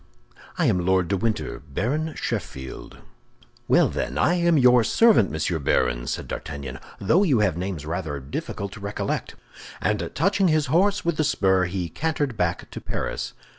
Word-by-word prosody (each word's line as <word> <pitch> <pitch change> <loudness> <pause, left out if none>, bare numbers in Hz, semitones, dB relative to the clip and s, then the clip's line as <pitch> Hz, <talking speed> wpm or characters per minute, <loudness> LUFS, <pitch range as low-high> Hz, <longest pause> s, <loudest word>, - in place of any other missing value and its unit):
"I - - +2
am 90 -1 +2
Lord 95 -1 +2
de 100 - +2
Winter, 110 +2 -2
Baron 125 - -2
Sheffield." 65 -1 -5 0.7
"Well, - - +5
then, - - -3
I 175 - +3
am 170 -2 +3
your 125 -2 +6
servant, 220 - +4
Monsieur 80 +2 -1
Baron," - - +1
said - - -3
D'Artagnan, 70 -2 -6 0.2
"though 155 - +3
you 140 - +3
have 95 -6 +2
names 90 -4 -4
rather 80 -3 -3
difficult 75 +8 -5
to - - -10
recollect." 100 0 -3 0.4
And - - -1
touching 195 +4 +2
his 155 -3 +2
horse 195 +3 +3
with 170 -2 0
the 155 - +2
spur, 95 -10 +2
he 90 -1 -3
cantered 145 - -2
back 90 -3 -2
to - - -7
Paris. - - -4
100 Hz, 165 wpm, -24 LUFS, -, 0.7 s, your